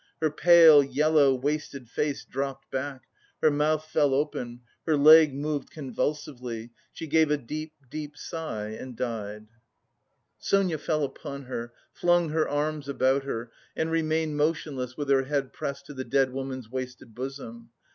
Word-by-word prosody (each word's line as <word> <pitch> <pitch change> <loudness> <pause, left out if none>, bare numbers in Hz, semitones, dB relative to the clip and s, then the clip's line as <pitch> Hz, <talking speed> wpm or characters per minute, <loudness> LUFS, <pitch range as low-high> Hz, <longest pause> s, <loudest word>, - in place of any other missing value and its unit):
Her 155 -2 +1
pale, 165 -1 +8
yellow, 145 -1 +3
wasted 140 -1 -3
face 145 +4 -2
dropped 135 0 -5
back, 135 0 -4 0.4
her 155 - +4
mouth 155 +1 +1
fell 145 -3 +2
open, 125 -4 -2 0.3
her 155 -2 +3
leg 155 +1 +8
moved 145 0 -3
convulsively, 125 -4 -4 0.2
she - - -7
gave 160 0 +3
a 150 - +2
deep, 155 +4 -6
deep 150 +2 -7
sigh 145 -13 -5
and 120 +3 -8
died. 105 -3 -4 0.9
Sonia 185 -6 +1
fell 155 0 0
upon 140 0 -6
her, 120 -2 -5 0.2
flung 175 -1 +2
her 155 +1 0
arms 145 0 -2
about 135 0 +1
her, 115 -3 -4 0.2
and 160 0 -1
remained 160 -1 0
motionless 145 -5 -1
with 145 -1 -3
her 135 -1 +4
head 140 -1 -2
pressed 140 0 -5
to 145 - -9
the 130 -1 -5
dead 135 -1 +1
woman's 130 -3 -5
wasted 130 -3 -6
bosom. 120 -2 -7
140 Hz, 150 wpm, -27 LUFS, 130-155 Hz, 0.9 s, pale